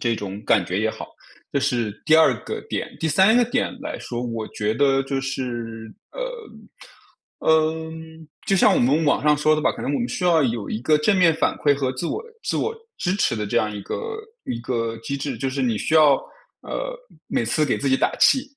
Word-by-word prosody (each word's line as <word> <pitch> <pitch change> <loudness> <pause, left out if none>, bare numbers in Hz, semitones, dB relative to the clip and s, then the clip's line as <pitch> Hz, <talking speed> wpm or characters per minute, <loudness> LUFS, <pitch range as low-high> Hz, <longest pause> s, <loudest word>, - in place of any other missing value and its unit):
这 120 -1 +1
种 100 -1 -6
感 100 -5 +3
觉 90 +2 -2
也 110 - +1
好。 - - -8 0.4
这 140 - 0
是 120 -5 0
第 155 0 +5
2 140 -7 +5
个 - - -4
点。 - - -4
第 160 - 0
3 190 +8 +5
个 245 - +5
点 245 +2 -1
来 305 +2 -5
说， 120 0 -5
我 115 -3 -4
觉 105 +1 -2
得 135 +1 +3
就 135 0 -2
是， 120 -4 -5 0.2
呃， - - -7
嗯， 160 0 -1 0.2
就 195 - +2
像 190 - +5
我 - - +2
们 140 +6 +3
网 145 - +2
上 150 0 +4
说 155 +1 +3
的 155 - -2
吧， - - +2
可 - - -9
能 140 - -2
我 - - 0
们 240 - -1
需 180 - -3
要 165 -4 +4
有 115 -5 -1
一 - - -2
个 150 +3 +3
正 195 +7 +2
面 175 -3 +5
反 160 - 0
馈 145 -1 +3
和 135 -2 -1
自 165 +7 -4
我 440 - -3 0.2
自 - - -1
我 455 - -1 0.2
支 180 -1 0
持 195 - +1
的 105 -2 -3
这 - - -2
样 105 -1 +1
一 100 - -5
个 440 - -5 0.3
一 115 - -3
个 115 -2 -2
机 115 +5 -4
制， 135 -3 -4
就 135 - -1
是 130 0 -2
你 115 -4 +1
需 155 - -1
要， 155 -3 +7 0.5
呃， - - -4 0.3
每 - - 0
次 155 - +2
给 140 - 0
自 140 - -1
己 130 - +4
打 - - +1
气。 265 - +5
140 Hz, 240 characters per minute, -23 LUFS, 120-160 Hz, 0.5 s, 要